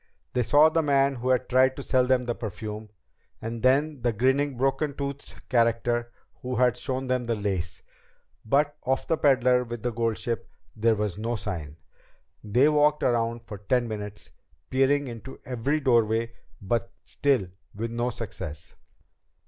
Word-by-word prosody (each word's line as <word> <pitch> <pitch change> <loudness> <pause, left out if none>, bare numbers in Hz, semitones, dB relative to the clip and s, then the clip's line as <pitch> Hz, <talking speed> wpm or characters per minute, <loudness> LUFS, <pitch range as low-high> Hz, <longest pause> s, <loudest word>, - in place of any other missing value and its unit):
They 125 - +2
saw 145 +6 +6
the 165 +1 +2
man 140 -2 +2
who 125 +2 -2
had 130 0 +2
tried 130 +1 +4
to 140 - -6
sell 130 -1 +2
them 125 -1 +2
the 120 - -1
perfume, 110 -1 -6 0.5
and 115 0 -5
then 140 +2 +2
the 120 0 +2
grinning, 130 +4 +1
broken 135 +3 0
toothed 140 0 -5
character 120 0 +1 0.3
who 125 0 -3
had 125 0 +3
shown 130 +1 -3
them 130 -1 0
the 115 -1 0
lace. 95 -5 -3 0.6
But 145 +5 +2
of 130 +1 0
the 165 - +1
peddler 130 -4 +3
with 120 -2 -7
the 120 - 0
gold 115 -1 -1
ship 115 -3 -3 0.3
there 110 +1 +3
was 105 -2 -2
no 115 +2 -1
sign. 80 -9 -5 0.7
They 120 +7 +4
walked 150 0 +3
around 115 -1 +1
for 105 -4 -8
ten 120 +4 +1
minutes, 105 -2 -7 0.4
peering 135 +2 +2
into 120 +2 -8
every 130 +5 -1
doorway, 115 -3 +2 0.3
but 115 +4 -1
still 130 -10 0 0.3
with 115 +2 -3
no 120 +1 -1
success. 95 -9 -7
120 Hz, 160 wpm, -26 LUFS, 115-135 Hz, 0.7 s, saw